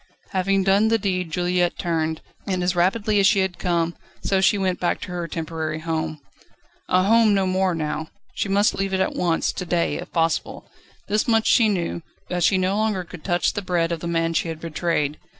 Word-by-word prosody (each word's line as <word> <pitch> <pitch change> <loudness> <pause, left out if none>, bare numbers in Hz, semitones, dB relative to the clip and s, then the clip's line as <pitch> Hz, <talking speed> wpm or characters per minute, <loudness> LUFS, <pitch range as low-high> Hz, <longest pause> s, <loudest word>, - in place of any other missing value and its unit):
Having 195 +1 +1
done 195 +3 +4
the 225 0 +3
deed 185 -4 -2
Juliette 175 +1 0
turned, 160 -2 -1 0.3
and 185 -2 -1
as 180 0 +1
rapidly 205 +4 +2
as 195 - +5
she 210 - +4
had 190 -2 -2
come, 170 -2 0 0.3
so 195 -1 +1
she 200 +2 +4
went 185 -2 -1
back 175 - 0
to 185 - -6
her 175 -1 -3
temporary 160 -1 -4
home. 160 -1 -3 0.7
A 185 0 +4
home 220 0 +4
no 195 -1 +2
more 185 -1 +1
now; 155 0 -3 0.3
she 200 - -2
must 200 +2 +3
leave 195 0 -1
it - - 0
at 190 - 0
once, 170 -2 +1
to - - -5
day 175 -1 0
if - - -8
possible. 165 -1 -1 0.4
This 210 +2 +1
much 225 -1 +3
she 225 -3 +5
knew, 175 -3 -2 0.3
that 180 -1 -1
she 190 - +4
no 185 +2 +1
longer 215 -4 0
could 175 -2 -12
touch 175 -2 +1
the 205 - -3
bread 175 -3 0
of 170 - -2
the 170 - -5
man 165 0 0
she 165 - 0
had 160 -1 -5
betrayed. 160 -2 -1
180 Hz, 210 wpm, -23 LUFS, 165-195 Hz, 0.7 s, as